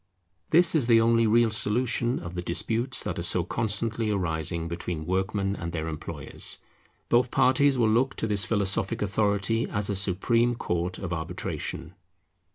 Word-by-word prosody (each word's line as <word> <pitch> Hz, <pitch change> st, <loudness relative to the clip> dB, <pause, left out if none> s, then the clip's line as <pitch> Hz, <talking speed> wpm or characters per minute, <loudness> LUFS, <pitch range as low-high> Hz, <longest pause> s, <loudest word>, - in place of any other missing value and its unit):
This 170 Hz, +1 st, +5 dB
is 145 Hz, -8 st, +2 dB
the 115 Hz, -2 st, +6 dB
only 115 Hz, 0 st, +3 dB
real 115 Hz, +1 st, +3 dB
solution 120 Hz, +3 st, +1 dB
of 85 Hz, 0 st, -7 dB
the 90 Hz, -, -3 dB
disputes 115 Hz, +8 st, -1 dB
that -, -, -3 dB
are -, -, -2 dB
so -, -, +1 dB
constantly 110 Hz, +1 st, -1 dB
arising 85 Hz, -4 st, -2 dB
between 85 Hz, -1 st, -4 dB
workmen 95 Hz, +2 st, -1 dB
and 85 Hz, -2 st, -6 dB
their 80 Hz, -1 st, -3 dB
employers. 75 Hz, -2 st, -4 dB, 0.5 s
Both 120 Hz, +1 st, +3 dB
parties 135 Hz, +2 st, +3 dB
will 115 Hz, -2 st, +3 dB
look 125 Hz, +5 st, +1 dB
to -, -, -2 dB
this 105 Hz, -3 st, +1 dB
philosophic 100 Hz, +1 st, -1 dB
authority 105 Hz, +2 st, 0 dB
as 105 Hz, 0 st, -1 dB
a -, -, -1 dB
supreme 115 Hz, +6 st, +1 dB
court 90 Hz, -3 st, -2 dB
of 90 Hz, -3 st, -4 dB
arbitration. 80 Hz, 0 st, -4 dB
105 Hz, 160 wpm, -26 LUFS, 90-115 Hz, 0.5 s, the